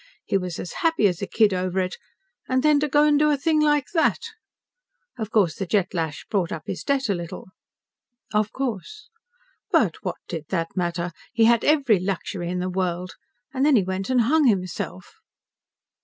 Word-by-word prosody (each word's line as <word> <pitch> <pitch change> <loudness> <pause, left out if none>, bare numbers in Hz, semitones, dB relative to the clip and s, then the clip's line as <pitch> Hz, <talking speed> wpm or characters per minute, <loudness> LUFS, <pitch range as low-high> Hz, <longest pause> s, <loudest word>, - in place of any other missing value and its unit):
He - - -1
was 180 -3 -1
as 180 - -6
happy 325 - +2
as 180 -3 -2
a - - -2
kid 215 -3 +3
over 185 0 -1
it, 185 0 -2 0.5
and 260 0 +1
then 300 -1 +5
to 300 - 0
go 295 +1 +4
and 295 -1 +4
do 300 0 +4
a 295 - +2
thing 310 +2 +2
like 295 -2 +3
that! 370 +7 +1 0.9
Of 215 -2 -3
course, 195 -8 +2
the 195 - -4
Jet 190 -1 +1
lash 160 -3 -3
brought 190 -5 -1
up 155 - -5
his 185 - -5
debt 275 -1 0
a 200 - +1
little." 175 0 -7 0.8
"Of 210 0 +1
course." 270 - -5 0.6
"But - - +2
what - - -3
did 160 -3 -5
that 165 -3 -2
matter? 175 -1 -2 0.2
He 225 0 +4
had 235 0 +4
every 275 - +3
luxury 185 -1 -3
in 180 - -2
the 180 0 -2
world. 180 -1 -2 0.4
And 265 0 0
then 295 -1 +5
he 210 - +4
went 190 +3 -3
and 255 -2 +3
hung 290 +5 +3
himself." 185 - -2
200 Hz, 190 wpm, -24 LUFS, 180-280 Hz, 0.9 s, then